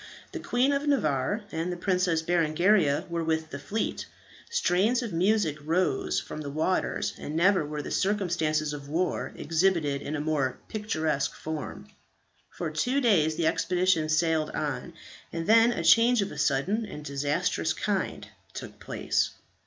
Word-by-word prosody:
The - - -5
Queen 255 +4 +1
of 280 +1 -1
Navarre 180 - +1
and 165 +2 -2
the 175 - -4
Princess 180 -3 +1
Berengaria 170 -1 +2
were 170 -1 -2
with 160 0 -1
the 140 - -5
fleet. 200 +10 -3 0.4
Strains 225 - +2
of 230 - -5
music 175 -3 +1
rose 170 +4 +1
from 155 - -7
the 145 - -5
waters, 155 +6 -1
and 150 - -5
never 185 +2 +4
were 150 0 -5
the - - -6
circumstances 165 -7 0
of 140 -1 -8
war 175 +4 -1
exhibited 160 -4 +1
in 150 - -4
a - - -2
more 145 -4 0
picturesque 160 -10 -1
form. 155 -2 -6 0.6
For 165 -3 -5
two 245 - 0
days 170 - +3
the 165 - -1
expedition 175 -1 +1
sailed 160 -1 +2
on, 150 +3 -4 0.4
and 165 0 -4
then 230 +3 +6
a 170 - -3
change 230 +7 +5
of 200 - -6
a - - -8
sudden 155 +12 +1
and 150 -8 -8
disastrous 145 +4 0
kind 200 -3 -2 0.3
took - - -8
place. - - -1
165 Hz, 155 wpm, -27 LUFS, 155-195 Hz, 0.6 s, then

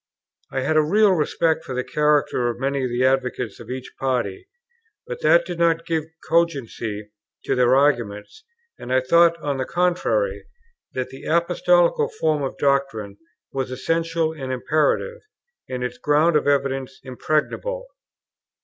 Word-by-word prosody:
I 130 - -1
had 155 +4 +1
a - - +6
real 200 +7 +4
respect 160 -1 +1
for 130 - -6
the 125 - -1
character 150 -5 +1
of 120 - -5
many 135 0 -1
of 130 - -1
the 120 +2 +1
advocates 125 -4 0
of 115 - -11
each 130 0 -6
party, 125 -8 -2 0.6
but 485 0 -7
that 170 0 +4
did 175 -1 -6
not 165 -1 +2
give 160 -2 -1 0.2
cogency 115 -10 -1 0.3
to - - +1
their 125 0 +4
arguments; 125 - 0 0.4
and 125 - -7
I 130 - +4
thought, 170 +6 +4
on 145 -2 -1
the 130 - -2
contrary, 180 - 0 0.5
that 130 -1 -3
the 135 - -11
Apostolical 485 - +2
form 155 -2 +1
of 135 - -4
doctrine 135 -8 0 0.3
was 135 -1 -2
essential 165 +4 -1
and 135 -4 -6
imperative, 155 - 0 0.5
and 125 -1 -3
its 125 0 -4
grounds 155 +3 +3
of 150 - +2
evidence 135 -2 0
impregnable. 155 - -2
140 Hz, 150 wpm, -22 LUFS, 130-170 Hz, 0.6 s, a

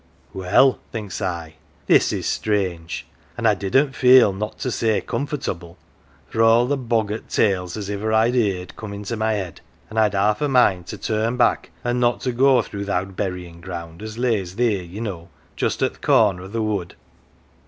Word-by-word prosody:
" - - -34
' - - -31
Well,' 95 +8 +3
thinks 105 -3 -5
I, 85 -4 -4
' - - -34
this - - +4
is - - -3
strange! 90 -6 -2 0.2
' - - -31
an' 120 - -3
I 110 - +6
didn't 120 +9 +1
feel 125 -5 +6
not 105 +3 -5
to 130 - -1
say 110 -2 +1
comfortable, 95 - -4 0.5
for 115 - -1
all 115 +2 +5
the 145 +3 0
boggart 115 -4 -2
tales 90 -3 +1
as 100 -2 -5
iver 105 +2 -2
I'd 110 +2 +3
heerd 100 -7 -1
come 110 -2 -7
into 105 +3 -4
my 110 0 0
head, 95 -6 -5 0.3
an' 110 - 0
I'd 105 -2 +3
half 105 +2 +2
a 150 - +2
mind 100 -9 +3
to - - -6
turn 110 +2 -1
back 120 -2 +2
an' 120 0 0
not 120 +1 +1
go 130 -1 +4
through 100 -1 -6
th' - - -7
owd 95 0 -2
buryin' 90 -3 -4
ground 85 -1 -7
as 110 0 -7
lays 110 -7 0
theer, 115 -5 +1
ye 90 +4 -9
know, 90 -7 -5 0.3
just - - -1
at - - +1
th' - - -23
corner 100 -5 +3
o' 95 - -8
the 110 +3 -2
wood. 100 -5 -2
105 Hz, 200 wpm, -22 LUFS, 95-115 Hz, 0.5 s, I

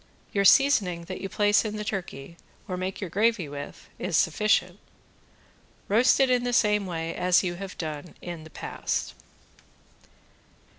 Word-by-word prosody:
Your 200 -1 +1
seasoning 195 -9 +4
that 185 +2 -7
you 195 - -4
place 205 +1 +3
in 215 -1 -4
the 210 - -4
turkey, 175 -7 -5 0.3
or 185 - -3
make 185 +1 -4
your 190 - -4
gravy 215 -3 +1
with, 145 0 -9
is 180 -3 0
sufficient. 180 +1 +1 1.1
Roast 235 +7 +4
it 270 - +5
in 250 -1 +2
the 245 0 -1
same 210 -4 +2
way 165 -2 -3
as 180 +1 +3
you 175 -2 -1
have 195 -2 -7
done 155 0 -6
in 170 -3 -7
the 160 - -12
past. - - -4
190 Hz, 155 wpm, -26 LUFS, 170-210 Hz, 1.1 s, it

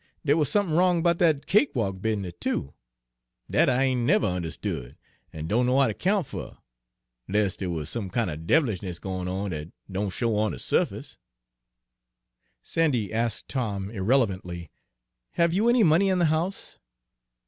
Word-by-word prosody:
Dere 145 0 +4
wuz 155 -2 +2
somethin' 195 -4 +1
wrong 175 -1 +3
'bout 170 -1 +2
dat 155 -5 +3
cakewalk 115 - +1
business, 100 -5 -2
too, 70 - -2 0.7
dat - - +3
I 130 +1 +2
ain' 130 -2 +1
never 115 - +3
unde'stood 85 -9 -4 0.4
an' 80 -1 -6
don' 120 +8 +1
know 130 +2 +3
how 135 - +5
ter 110 - 0
'count 190 - +1
fer, - - -8 0.7
'less 100 -1 +1
dere 95 - -4
wuz 80 -3 -3
some 105 -5 -4
kin' 115 +3 0
er 80 - -3
dev'lishness 95 - 0
goin' 95 -1 -4
on 95 +2 -3
dat 75 -1 -5 0.2
don' 100 +2 -1
show 115 +3 -1
on 110 0 +1
de - - -6
su'face." - - -1 1.4
"Sandy," 130 -11 0
asked 115 -1 -1
Tom 105 -6 -3
irrelevantly, 95 - 0 0.6
"have 170 0 +2
you 215 +6 +3
any 240 -1 +5
money 170 +4 +4
in 185 - +2
the 175 - +3
house?" 175 +5 -3
115 Hz, 160 wpm, -26 LUFS, -, 1.4 s, how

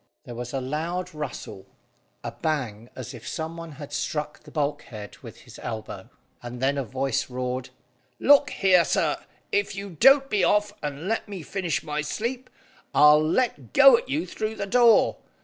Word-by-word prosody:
There 120 - -9
was 120 +1 -6
a 135 - -2
loud 165 +7 -3
rustle; 125 -9 -7 0.6
a - - -4
bang 125 -8 -3
as 130 -1 -7
if 120 -2 -10
some 160 +1 -4
one 165 -2 -8
had 145 0 -10
struck 150 -1 -3
the 150 - -16
bulkhead 145 -8 -4
with - - -12
his - - -14
elbow, 110 -2 -6 0.3
and 120 0 -7
then 140 +2 +1
a - - -1
voice 130 +1 -2
roared 125 0 -3 0.5
"Look 285 0 +5
here, 185 -3 +4
sir, - - +1 0.3
if 405 - 0
you 200 0 -6
don't 270 - +5
be 210 -7 +1
off 205 +3 +2
and 150 +3 -5
let 225 0 -2
me 190 -5 -6
finish 180 -1 -2
my 150 -1 -2
sleep, 240 - -4 0.5
I'll 150 +1 +7
let 205 +11 -1
go - - +8
at 475 +1 -3
you 310 +3 -1
through 215 0 -4
the 200 - -3
door. 235 +2 +4
155 Hz, 175 wpm, -25 LUFS, 130-205 Hz, 0.6 s, go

